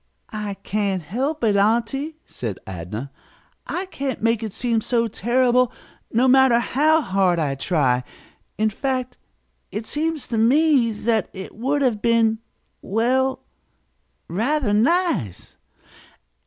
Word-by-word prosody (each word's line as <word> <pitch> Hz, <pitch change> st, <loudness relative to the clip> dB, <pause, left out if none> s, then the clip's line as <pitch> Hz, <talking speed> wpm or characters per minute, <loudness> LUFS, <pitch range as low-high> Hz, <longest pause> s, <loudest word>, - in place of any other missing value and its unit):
"I 210 Hz, -2 st, -4 dB
can't 195 Hz, -2 st, -2 dB
help 260 Hz, -, -2 dB
it, 210 Hz, -3 st, +3 dB
aunty," 235 Hz, +9 st, +1 dB
said 110 Hz, -6 st, -5 dB
Adnah. 95 Hz, +9 st, -6 dB, 0.6 s
"I 370 Hz, -, -3 dB
can't 275 Hz, -8 st, -4 dB
make 230 Hz, 0 st, +1 dB
it 220 Hz, -2 st, -4 dB
seem 230 Hz, +1 st, 0 dB
so 235 Hz, 0 st, +1 dB
terrible, 245 Hz, +3 st, +2 dB, 0.4 s
no 245 Hz, +3 st, +3 dB
matter 260 Hz, -2 st, +6 dB
how 305 Hz, +7 st, +2 dB
hard 190 Hz, -, +1 dB
I 150 Hz, -4 st, 0 dB
try. 135 Hz, -4 st, +1 dB, 0.5 s
In 215 Hz, 0 st, +1 dB
fact 255 Hz, +1 st, -3 dB, 0.5 s
it -, -, -4 dB
it 220 Hz, -, -5 dB
seems 310 Hz, +3 st, -2 dB
to 230 Hz, -2 st, 0 dB
me 270 Hz, +1 st, +4 dB
that 220 Hz, 0 st, 0 dB
it 190 Hz, 0 st, -8 dB
would 275 Hz, +5 st, 0 dB
have 230 Hz, -5 st, +1 dB
been 225 Hz, -1 st, +2 dB, 0.4 s
well 255 Hz, +5 st, 0 dB, 0.9 s
rather 230 Hz, -, 0 dB
nice." 250 Hz, -, 0 dB
230 Hz, 130 wpm, -22 LUFS, 200-265 Hz, 0.9 s, matter